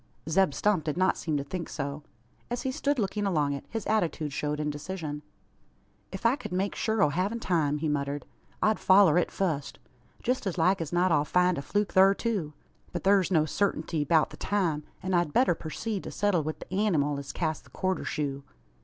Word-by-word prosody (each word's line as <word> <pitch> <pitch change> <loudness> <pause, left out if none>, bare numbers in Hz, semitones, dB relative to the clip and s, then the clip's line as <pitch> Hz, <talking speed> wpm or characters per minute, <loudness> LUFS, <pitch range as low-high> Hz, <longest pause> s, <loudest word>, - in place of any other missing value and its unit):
Zeb 165 -2 +2
Stump 205 -6 +2
did 155 +1 -2
not 185 +1 +3
seem 155 -3 -2
to 140 - -2
think 170 +4 -5
so. 140 0 -4 0.5
As 245 0 -3
he 265 - -1
stood 280 +2 0
looking 205 -1 -1
along 150 -6 +1
it, 140 - -7
his 225 -1 -4
attitude 165 -8 0
showed 150 +1 -2
indecision. 150 +1 -4 0.9
"If - - -7
I 230 +3 +5
ked - - -8
make 190 +2 0
shur 220 -1 +1
o' 150 - +4
havin' 190 +9 -1
time," 155 -8 +1
he 155 +1 -2
muttered, 145 -1 -2 0.4
"I'd 215 0 +3
foller 185 -4 +6
it - - 0
fust. 160 -7 -2 0.5
Jest 250 -3 0
as 185 - -2
like 185 +2 +3
as 160 - -4
not 180 +1 +2
I'll 145 -2 +4
find 180 +3 +2
a - - -3
fluke 205 +7 -1
thur 195 +1 +6
too. 200 -11 -2 0.4
But 175 - -4
thur's 195 -2 +4
no 160 -5 +4
sartinty 160 -2 -1
'beout 155 +1 +3
the - - -10
time, 175 -7 0 0.2
an 185 0 -2
I'd 175 -4 +1
better 250 -7 +4
purceed 190 +6 -4
to - - -4
settle 205 -5 +1
wi' 155 +1 -3
the - - -10
anymal 145 -6 +1
as 140 -1 -6
cast 160 0 -2
the - - -18
quarter 185 -1 -2
shoe." 140 -2 -3
175 Hz, 205 wpm, -28 LUFS, 150-195 Hz, 0.9 s, foller